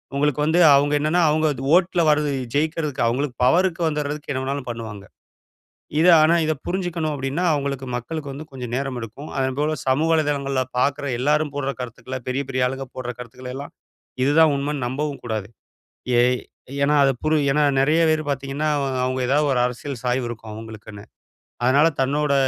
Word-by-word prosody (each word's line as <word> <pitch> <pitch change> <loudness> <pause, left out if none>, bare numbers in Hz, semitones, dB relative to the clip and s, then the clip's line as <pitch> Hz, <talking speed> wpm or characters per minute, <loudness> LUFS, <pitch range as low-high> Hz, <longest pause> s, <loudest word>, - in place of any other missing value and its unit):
உங்களுக்கு 150 0 +1
வந்து 160 +3 +2 0.2
அவங்க 145 +1 +2
என்னனா 155 +4 +2
அவங்க 155 +1 +2 0.3
ஓட்ல 180 -1 +3
வருது 150 -1 +2 0.2
ஜெயிக்றதுக்கு 155 -1 -1
அவங்களுக்கு 125 +2 -1
பவர்க்கு 175 +5 +2
வந்துறதுக்கு 150 -1 -3
என்ன 130 -1 -2
வேணுனாலும் 135 0 -3
பண்ணுவாங்க. 110 -4 -6 1.0
இத 165 - +4 0.2
ஆனா 160 +2 +5
இத 155 - +2
புரிஞ்சுக்கணும் 175 -4 -2
அப்டின்னா, 140 +5 -2
அவங்களுக்கு 140 -2 -2
மக்களுக்கு 145 +4 -5
வந்து 145 +3 -7
கொஞ்சம் 125 -3 -6
நேரம் 135 -2 -3
எடுக்கும். 115 +6 -8
அதன்போல 135 +4 0
சமூக 135 +5 +2
வலைதளங்கள்ல 140 -4 0 0.2
பாக்குற 140 +2 0
எல்லாரும் 150 +3 +1
போடுற 140 -1 -1
கருத்துக்கள 125 +1 -6
பெரிய 130 +2 -1
பெரிய 130 -1 +1
ஆளுங்க 135 +1 -5
போடுற 125 -1 -4
கருத்துக்கள 125 +1 -9
எல்லாம் 140 +1 -7 0.5
இதுதான் 155 +2 +5
உண்மன்னு 140 -1 -2
நம்பவும் 140 +3 -3
கூடாது. 110 -4 -3 0.7
ஏ - - +6 0.6
ஏன்னா 145 +1 +3
அத 135 - +4
புரு 155 0 +3 0.2
ஏன்னா 150 +2 +2 0.2
நிறைய 155 +5 +3
பேர் 155 0 +1
பாத்திங்கன்னா, 140 +2 -2
அவ - - -1 0.2
அவங்க 130 +1 -1
எதாவது 145 +2 +2
ஒரு 125 - +1
அரசியல் 125 +1 -6
சாய்வு 125 0 0
இருக்கும் 110 -2 -8
அவங்களுக்குன்னு. 110 -2 -10 0.6
அதனால 140 +5 +5
தன்னோட 145 +2 +1
140 Hz, 160 wpm, -22 LUFS, 130-150 Hz, 1.0 s, ஏ